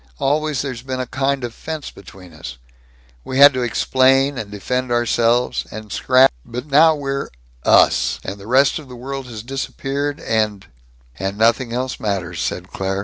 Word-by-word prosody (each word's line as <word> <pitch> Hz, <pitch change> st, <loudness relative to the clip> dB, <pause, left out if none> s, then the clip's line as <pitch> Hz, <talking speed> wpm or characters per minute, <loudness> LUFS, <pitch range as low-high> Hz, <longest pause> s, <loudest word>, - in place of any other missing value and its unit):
Always 150 Hz, 0 st, 0 dB
there's 130 Hz, -4 st, -5 dB
been 130 Hz, 0 st, -4 dB
a 130 Hz, -, -2 dB
kind 135 Hz, +1 st, -1 dB
of 120 Hz, -1 st, -4 dB
fence 155 Hz, +1 st, -6 dB
between 90 Hz, -2 st, -14 dB
us. 65 Hz, -1 st, -9 dB, 0.7 s
We 130 Hz, -, -4 dB
had 140 Hz, +1 st, +9 dB
to 130 Hz, -, -2 dB
explain 130 Hz, +3 st, +2 dB
and 110 Hz, -5 st, -5 dB
defend 125 Hz, +5 st, -3 dB
ourselves 120 Hz, 0 st, +1 dB
and 110 Hz, -1 st, -9 dB
scrap 130 Hz, +1 st, +4 dB
But 125 Hz, +3 st, -6 dB
now 155 Hz, +2 st, +5 dB
we're 140 Hz, -1 st, -3 dB, 0.3 s
us, -, -, +4 dB
and 100 Hz, +2 st, -6 dB
the 100 Hz, -, -11 dB
rest 135 Hz, +5 st, +3 dB
of 150 Hz, -, -12 dB
the 125 Hz, -, -9 dB
world 135 Hz, +2 st, -6 dB
has 110 Hz, -3 st, -8 dB
disappeared, 135 Hz, +2 st, -3 dB
and 105 Hz, -3 st, -1 dB, 0.3 s
" -, -, -27 dB
"And 95 Hz, +2 st, -3 dB
nothing 115 Hz, +2 st, +2 dB
else 125 Hz, +2 st, -3 dB
matters," 90 Hz, -5 st, -3 dB
said 90 Hz, +1 st, -4 dB
Claire. 95 Hz, 0 st, -2 dB
125 Hz, 175 wpm, -20 LUFS, 105-135 Hz, 0.7 s, had